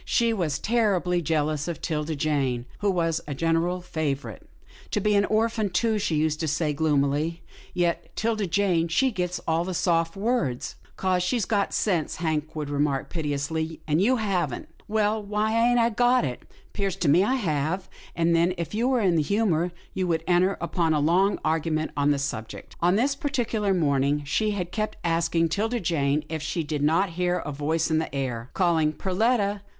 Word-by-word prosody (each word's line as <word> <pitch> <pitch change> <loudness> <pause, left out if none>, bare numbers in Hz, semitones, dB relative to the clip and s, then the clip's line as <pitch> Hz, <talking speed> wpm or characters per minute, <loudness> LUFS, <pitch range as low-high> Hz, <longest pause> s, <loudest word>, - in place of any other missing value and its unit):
She 230 -1 +2
was 165 -8 -1
terribly 190 -5 +1
jealous 155 -1 0
of 170 - -4
'Tilda 155 -1 -2
Jane 135 -5 0
who 205 - +1
was 165 -3 0
a 145 - -4
general 165 +4 0
favourite. 155 -5 -3 0.5
I - - +2
be 210 +1 +1
an 200 0 +4
orphan, 220 -1 +1
too," 215 +4 +1
she 195 -6 0
used 155 0 +1
to 160 - -1
say, 150 +1 0
gloomily, 150 +2 0
" - - -19
yet 170 -2 0
'Tilda 220 -3 0
Jane, 175 -2 +1
she 260 +11 +2
gits 180 -3 -2
all 165 +1 +2
the 185 0 -4
soft 165 -1 +1
words." 195 - -1
" - - -29
'Cause 185 -1 +1
she's 215 +3 0
got 205 -3 0
sense," 175 -7 0
Hank 160 -1 -2
would 150 -2 -3
remark 145 -1 0
pitilessly, 160 +1 -2
" - - -27
and 155 +3 +2
you 250 +6 +4
haven't." 185 - -2
" - - -29
Well, 215 0 +1
why 210 +2 -1
ain't 245 - +3
I 235 0 +3
got 245 -2 +3
it? 125 -2 -6 0.2
'Pears 195 -2 -1
to 180 -5 -1
me 165 +7 +5
I 255 +6 +1
have," 170 - -1 0.3
and 170 0 +2
then, 170 +2 +2
if 170 -2 -4
he 220 +3 -1
were 255 -2 +2
in 180 -5 +3
the - - +3
humour, 180 -1 +1 0.2
they 190 - 0
would 165 -2 0
enter 185 +2 +2
upon 165 -4 0
a - - +2
long 180 +7 +3
argument 155 0 0
on 145 0 +2
the 145 - +3
subject. 115 -6 -5
On 175 +2 +3
this 265 +6 +2
particular 240 -8 -1
morning, 145 -4 +1
she 215 +10 +1
had 180 -4 -3
kept 215 -1 -3
asking 165 0 +1
'Tilda 225 +8 -1
Jane 150 -5 0
if 160 -1 -4
she 160 +2 -2
did 150 -1 -3
not 165 +6 +2
hear 180 0 +2
a 155 - -4
voice 155 +3 -1
in 160 - +3
the 160 - -4
air, 125 -3 -3
calling, 165 -4 +2
"Perletta! 205 +2 0
170 Hz, 195 wpm, -25 LUFS, 155-200 Hz, 0.5 s, me